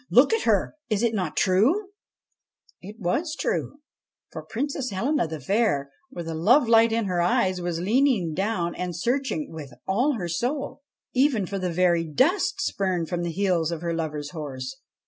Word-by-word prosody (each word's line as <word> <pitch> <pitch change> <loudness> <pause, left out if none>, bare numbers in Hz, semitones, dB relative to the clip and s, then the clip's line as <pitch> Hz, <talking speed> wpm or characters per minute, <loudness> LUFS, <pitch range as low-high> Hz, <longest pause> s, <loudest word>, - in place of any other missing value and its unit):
Look 260 - +5
at 450 - 0
herl 210 -5 +2 0.2
Is 215 0 0
it 235 -1 +2
not 185 -7 -2
true? 265 - +3 0.4
' - - -62 0.3
It 205 +3 -9
was 290 - -1
true, 290 - -2 0.5
for - - -6
Princess 275 +1 -3
Helena 235 - 0
the 160 -1 -6
Fair, 145 - 0 0.2
with 175 -10 -7
a 165 - -3
lovelight 225 - +5
in 225 -1 0
her 180 -2 0
eyes, 180 +1 +1
was 175 -1 -2
leaning 215 - +2
down 185 -2 -1
and 180 -1 -4
searching, 270 - -1
with 150 -4 -8 0.2
all 245 +10 +2
her 190 -8 -3
soul, 270 - -2 0.3
even 255 -6 +2
for 195 +1 -4
the 180 -1 -2
very 170 -1 +2
dust 355 - +1
spurned 185 -4 -1
from 175 -1 -2
the 175 - -2
heels 175 -3 +1
of 165 -2 -4
her 170 -1 -2
lover's 150 -3 -3
horse. 135 -5 -6
190 Hz, 175 wpm, -25 LUFS, 170-250 Hz, 0.5 s, Look